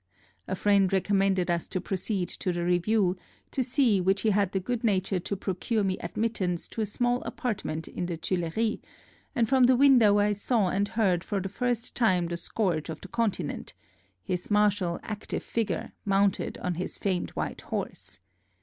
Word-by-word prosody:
A - - -1
friend 200 -1 +3
recommended 195 -2 +2
us 170 -1 -1
to 185 - -2
proceed 190 0 -2
to 185 - -2
the 175 0 -2
review, 180 +2 +2 0.4
to 260 - 0
see 245 -6 +3
which 195 +2 +2
he 220 - +3
had 200 -2 +2
the 190 - 0
good 240 +5 -3
nature 195 -3 +1
to 200 +3 -4
procure 200 +4 -1
me 190 -1 -1
admittance 195 -6 -2
to 225 - -4
a 215 - 0
small 245 +4 0
apartment 190 -9 -3
in 175 - -4
the 170 -2 -3
Tuileries, 185 +6 -1 0.6
and 230 -2 +2
from 260 0 +5
the 255 +1 +5
window 245 -6 +6
I 205 0 +3
saw 205 -1 +1
and 200 +3 +1
heard 190 -7 +1
for 200 - -2
the 190 +1 -4
first 245 +2 -2
time 185 -7 +2
the 170 0 -3
scourge 170 -3 -1
of 160 - -6
the - - -10
Continent 215 -9 -2 0.3
— 95 -1 -40
his 180 -1 -2
martial, 205 -4 +2
active 215 -1 -4
figure, 215 -6 -2
mounted 200 -1 +1
on 180 - -2
his 180 +2 -4
famed 185 -3 -1
white - - -3
horse. - - -5
195 Hz, 180 wpm, -28 LUFS, 180-220 Hz, 0.6 s, window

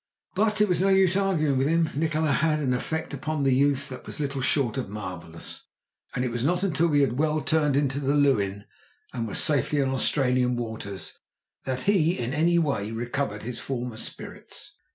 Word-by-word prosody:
But 210 +1 +1
it 210 - +5
was 180 -2 +1
no 195 - +3
use 190 -1 +4
arguing 160 -9 +1
with 135 - +2
him. 165 +1 +2
Nikola 155 0 +1
had 155 +3 +2
had - - -4
an 125 - +2
effect 160 +6 -3
upon 155 -2 -2
the 135 -1 +3
youth 140 +1 +2
that 130 - -8
was - - -6
little 140 -2 -2
short 130 -3 +1
of 125 - -4
marvellous, 90 -5 -8 0.5
and 125 - 0
it 125 - -2
was 120 0 -2
not 175 +6 +1
until 170 -3 +2
we 145 -3 +3
had 130 -1 +1
well 155 0 +2
turned 150 -1 +1
the 140 0 +1
Leuwin, 105 -9 +2 0.5
and 115 -2 -3
were 100 - -5
safely 145 0 +2
in 135 -1 +2
Australian 125 -2 +1
waters, 110 -5 -6 0.5
that 130 -1 -2
he 180 -4 +3
in 120 +1 -2
any 170 +3 +3
way 140 -11 0
recovered 120 -1 -3
his 120 +1 -5
former 125 -3 -4
spirits. - - -9
140 Hz, 195 wpm, -26 LUFS, 125-155 Hz, 0.5 s, it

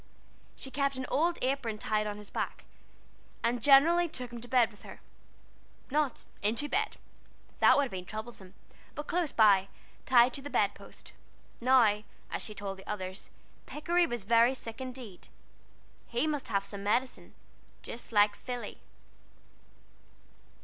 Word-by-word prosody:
She 265 - -7
kept 275 0 0
an 260 0 -4
old 340 +4 +1
apron 255 -5 -1
tied 215 0 -1
on 205 0 -4
his 210 -1 -11
back, - - -4 0.8
and 235 0 0
generally 325 +7 +6
took 250 -5 -6
him 235 - -7
to 245 - -9
bed 240 -2 +3
with 210 - -18
her - - -11 0.9
not 295 -2 0 0.2
into 225 +8 0
bed, 415 +7 -1 0.6
that - - +6
would 285 - +4
have 270 - -4
been 185 -1 -6
troublesome; 215 -3 -8 0.4
but 295 - -5
close 340 -3 0
by, 200 -4 +5 0.4
tied 245 -1 +6
to 275 - -4
the 285 - -7
bed - - +2
post. - - -13 0.5
Now, 235 -4 +4 0.3
as - - -2
she 215 - -6
told 195 -1 -5
the 190 - -13
others, 190 -2 -5 0.4
Pikery 340 +3 +1
was 240 -6 -4
very 230 +4 +4
sick 230 -1 -7
indeed. 250 -7 -8 0.8
He 240 +5 0
must 295 -4 -2
have 200 -3 0
some 200 0 -7
medicine, 245 +5 -1 0.5
just 235 - -8
like 205 -1 +4
Philly. 245 +1 -6
240 Hz, 150 wpm, -30 LUFS, 210-275 Hz, 0.9 s, generally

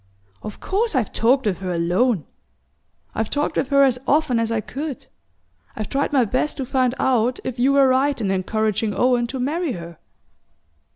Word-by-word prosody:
Of 215 - -8
course 415 -1 -1
I've 245 -6 0
talked 255 +3 +2
with 195 -4 0
her 185 -1 -4
alone 175 - +1 0.9
I've 220 -1 -2
talked 290 +1 -1
with 265 - 0
her 280 -1 +5
as 255 -2 +2
often 295 -5 +2
as 230 0 -1
I 230 - +1
could. 275 +5 -6 0.7
I've 215 - -5
tried 280 +2 -1
my 265 -4 +3
best 255 +7 -1
to 270 - -3
find 255 -1 +1
out 250 -1 +1
if 255 -1 -5
you 265 +3 +3
were 275 -1 +5
right 265 +2 +2
in 200 -4 -1
encouraging 210 +2 -1
Owen 245 -1 +2
to 265 +2 -5
marry 300 +3 -1
her." 170 -2 -9
250 Hz, 180 wpm, -22 LUFS, 215-275 Hz, 0.9 s, her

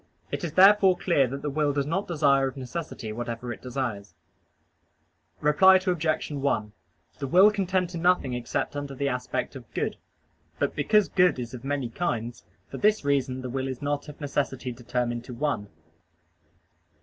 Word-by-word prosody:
It - - -3
is 165 -3 -3
therefore 195 0 +6
clear 155 -8 +2
that 140 +3 -6
the 150 - -1
will 145 0 +1
does 140 -1 0
not 180 +7 -2
desire 140 -5 +3
of 135 - -7
necessity 130 -4 -6
whatever 120 +1 -4
it - - -13
desires. 120 -7 -4 1.3
Reply 170 +6 +6
Obj. 175 -5 0
1: 135 -7 -1 0.5
The 140 - -3
will 190 +9 +6
can 200 -3 -2
tend 185 -1 +1
to 170 - -5
nothing 175 -7 +2
except 120 +3 -3
under 145 -1 -5
the 140 +1 -1
aspect 125 -2 -3
of - - -11
good. - - -1 0.6
But - - -1
because 210 +7 +3
good 180 -4 +3
is 120 -1 -6
of 125 -1 -8
many 140 -3 -2
kinds, 120 -4 -3 0.2
for - - -7
this 210 -6 +2
reason 130 -2 0
the 130 - -4
will 135 +1 -2
is 130 -2 -5
not 145 +1 -3
of 150 - -11
necessity 135 -3 -2
determined 120 0 -3
to 125 - -8
one. 125 -7 -1
140 Hz, 175 wpm, -26 LUFS, 125-170 Hz, 1.3 s, therefore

